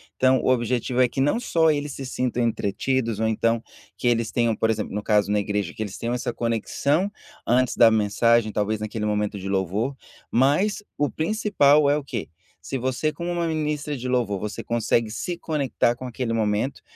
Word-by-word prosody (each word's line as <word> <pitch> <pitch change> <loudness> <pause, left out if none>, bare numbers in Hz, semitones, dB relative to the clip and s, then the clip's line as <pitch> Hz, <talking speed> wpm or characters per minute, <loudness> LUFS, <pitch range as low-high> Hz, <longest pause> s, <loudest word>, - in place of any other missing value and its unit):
Então 130 0 +4
o - - 0
objetivo 125 +1 +1
é 125 - +5
que 130 - -6
não 145 - +2
só 165 -9 +3
eles 145 -1 -2
se 135 - -6
sintam 125 -1 -1
entretidos 115 +1 -1
ou 110 - +1
então 115 +1 +1 0.3
que - - -1
eles 115 -2 +1
tenham, 115 -2 +1
por 110 - +1
exemplo, 110 -2 -2
no 105 - -2
caso 105 -1 +2
na 105 - +2
igreja 100 -3 -2
que 110 - -8
eles 105 -2 -4
tenham 120 +1 -2
essa 125 0 -2
conexão 130 - 0 0.3
antes 125 +1 +2
da 115 - +7
mensagem 110 +1 +2
talvez 105 +1 -1
naquele 110 0 -3
momento 105 -1 -1
de 95 +1 -5
louvor, 100 +7 -1 0.4
mas 150 - +2
o 145 -1 0
principal 155 -6 +3
é 145 - +3
o 150 - -4
quê, 125 -5 -5 0.3
se 135 - -4
você 130 +4 -1
como 170 +3 -4
uma 170 -1 -1
ministra 150 -2 -2
de 125 -1 -5
louvor 120 -6 0
você 105 0 -4
consegue 115 -1 0
se 170 +10 -4
conectar 140 -7 0
com 130 - -8
aquele 125 -1 -3
momento, 110 +3 0
120 Hz, 195 wpm, -24 LUFS, 110-140 Hz, 0.4 s, da